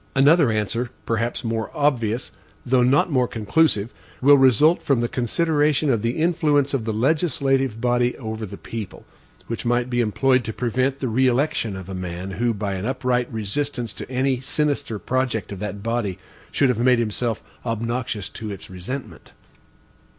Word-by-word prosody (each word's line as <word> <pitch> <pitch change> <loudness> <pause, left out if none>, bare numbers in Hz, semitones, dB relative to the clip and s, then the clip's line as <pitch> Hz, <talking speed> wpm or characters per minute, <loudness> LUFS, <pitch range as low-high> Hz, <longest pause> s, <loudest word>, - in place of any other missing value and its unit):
Another 145 +1 +5
answer, 115 +3 -1 0.2
perhaps 115 +2 -1
more 115 -1 -2
obvious, 125 -5 0 0.3
though 130 0 +3
not 135 +7 +3
more 125 -3 +2
conclusive, 115 0 +1 0.3
will 145 +2 +7
result 135 +5 +5
from 140 -4 +1
the 120 - +1
consideration 150 +3 +1
of 115 -4 +1
the 115 +2 -1
influence 155 -4 +2
of 125 -5 -1
the 110 - -1
legislative 135 -1 +1
body 125 0 +1
over 110 -2 -5
the 100 +1 -9
people; 110 -4 -7 0.4
which 115 - -5
might 120 +1 0
be 120 0 +2
employed 125 +3 +2
to 110 - -4
prevent 130 +4 0
the 135 - -3
re 130 +3 +2
election 125 -5 0
of 95 -1 -8
a 95 - -6
man 90 +1 -5
who, 115 +5 0
by 105 -2 -3
an 95 +1 -4
upright 125 -2 0
resistance 115 +2 -3
to - - -8
any 130 0 +1
sinister 145 -5 -1
project 120 -4 -1
of 100 - -6
that 100 0 -5
body, 115 -5 -1 0.3
should 140 - +2
have 120 -3 0
made 125 +1 +4
himself 115 0 -1 0.2
obnoxious 115 -2 -2
to 105 +1 -7
its 100 -2 -8
resentment. 110 +10 -7
120 Hz, 165 wpm, -23 LUFS, 110-135 Hz, 0.4 s, will